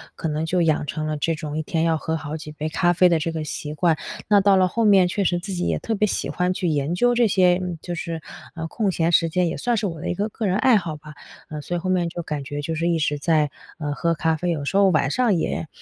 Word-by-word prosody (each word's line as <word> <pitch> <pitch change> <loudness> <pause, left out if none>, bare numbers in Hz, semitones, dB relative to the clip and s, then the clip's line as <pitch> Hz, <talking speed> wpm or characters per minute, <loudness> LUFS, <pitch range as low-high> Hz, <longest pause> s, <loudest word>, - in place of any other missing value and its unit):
可 - - -3
能 155 0 -2
就 180 +2 +1
养 155 -2 +1
成 155 +1 -3
了 155 0 -2
这 165 +2 0
种 155 -1 -5
一 - - 0
天 160 +1 -1
要 165 -1 +2
喝 160 +1 -2
好 155 -1 -6
几 155 -1 -8
杯 155 0 -4
咖 175 +2 +2
啡 180 +1 +5
的 170 -2 +2
这 165 +2 -2
个 160 -1 -4
习 150 0 -5
惯。 165 0 +2 0.3
那 205 -1 +6
到 200 0 +5
了 185 -1 +4
后 230 +6 -1
面 195 -4 +5
确 200 +3 -1
实 175 -1 +1
自 195 +2 -6
己 180 -1 -1
也 - - 0
特 225 - -3
别 210 0 +2
喜 - - -2
欢 180 0 0
去 180 -1 -2
研 150 +1 0
究 245 +6 +3
这 240 -1 +3
些， 180 -2 +3
嗯， 180 -2 -4
就 175 - -5
是 165 -1 -4 0.5
空 200 +3 -1
闲 170 -1 +1
时 165 -1 +3
间， 180 +2 +1
也 165 - -2
算 240 -1 0
是 210 - -1
我 165 -5 -4
的 - - -3
一 - - -1
个 205 +4 -1
个 220 0 -3
人 190 +1 +1
爱 250 +2 +4
好 170 -7 -1
吧。 150 0 -12 0.4
嗯， 150 -1 -5
所 175 +4 -3
以 - - -2
后 185 +2 -3
面 175 -2 +1
就 170 0 -6
感 150 -3 -4
觉 145 +2 -5
就 165 +3 -3
是 165 +2 -1
一 170 - +2
直 150 -2 -1
在， 150 -1 +2 0.3
呃， 145 -3 -3
喝 170 +2 0
咖 160 0 +1
啡， 175 +3 -2
有 155 -4 -2
时 165 - -3
候 200 -1 +5
晚 155 -4 +2
上 245 -6 +2
也 160 -1 -2
170 Hz, 315 characters per minute, -23 LUFS, 155-185 Hz, 0.5 s, 那